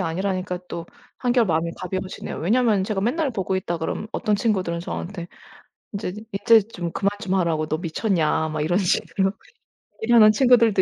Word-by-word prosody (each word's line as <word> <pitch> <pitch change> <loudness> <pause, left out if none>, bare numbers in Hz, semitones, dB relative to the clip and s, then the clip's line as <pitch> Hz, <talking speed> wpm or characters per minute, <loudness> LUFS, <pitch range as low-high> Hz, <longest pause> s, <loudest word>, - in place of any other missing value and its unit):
아니라니까 185 +1 -2
또 170 -1 -6 0.3
한결 245 -2 +2
마음이 165 -1 0
가벼워지네요. 185 +1 -5
왜냐하면 215 +3 +2
제가 205 -2 -2
맨날 275 +8 0
보고 190 -4 -2
있다 175 -2 -3
그러면 160 +6 -3
어떤 210 - 0
친구들은 190 -6 0
저한테 175 0 -6 0.7
인제 195 -3 -3 0.2
인제 225 +3 +5
좀 175 -6 -5
그만 200 +3 +1
좀 190 -4 -2
하라고 165 -4 +1
"너 155 - -1
미쳤냐?" 165 -2 0
막 155 -1 -3
이런 170 +4 +1
식으로 190 0 +1 0.7
얘기하는 220 -2 +7
친구들도 230 -4 +4
190 Hz, 390 characters per minute, -23 LUFS, 170-215 Hz, 0.7 s, 얘기하는